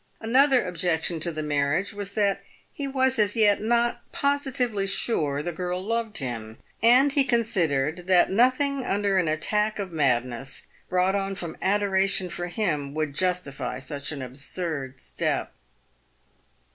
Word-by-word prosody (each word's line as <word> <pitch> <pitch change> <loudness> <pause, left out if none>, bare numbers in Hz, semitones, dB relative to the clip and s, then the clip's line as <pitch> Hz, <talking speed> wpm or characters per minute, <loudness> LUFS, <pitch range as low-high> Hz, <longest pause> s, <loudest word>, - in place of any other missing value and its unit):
Another 260 +1 +4
objection 170 -1 -1
to 170 +2 +1
the 155 -1 -4
marriage 150 +7 0
was 200 -1 -6
that 200 -2 +1 0.3
he 285 - -4
w 265 -1 -3
r - - +6
as 260 -2 +1
as 205 -1 +2
yet 210 -3 +4
not 235 +2 +1
posi 280 0 0
tively 220 -6 0
sure 150 -9 0
the 175 - -2
girl 180 +1 -3
loved 230 -1 -2
him, 115 -4 -5 0.2
and 250 +5 +6
he 280 -1 +3
considered 180 - 0
that 185 -1 +4
nothing 260 +5 +2
under 200 -3 +1
an 175 - +1
attack 210 +8 +1
of 195 -3 -4
madness, 130 -3 -1 0.2
brought 185 +1 +2
on 195 -1 -1
from 170 -4 -6
adoration 195 -2 +2
for 175 +1 -3
him, 155 -8 -2
would 155 -2 -2
justify 180 -7 -1
such 140 +2 -4
an 140 -3 -5
absurd 135 +1 -5
step. - - -3
185 Hz, 155 wpm, -25 LUFS, 155-220 Hz, 0.3 s, r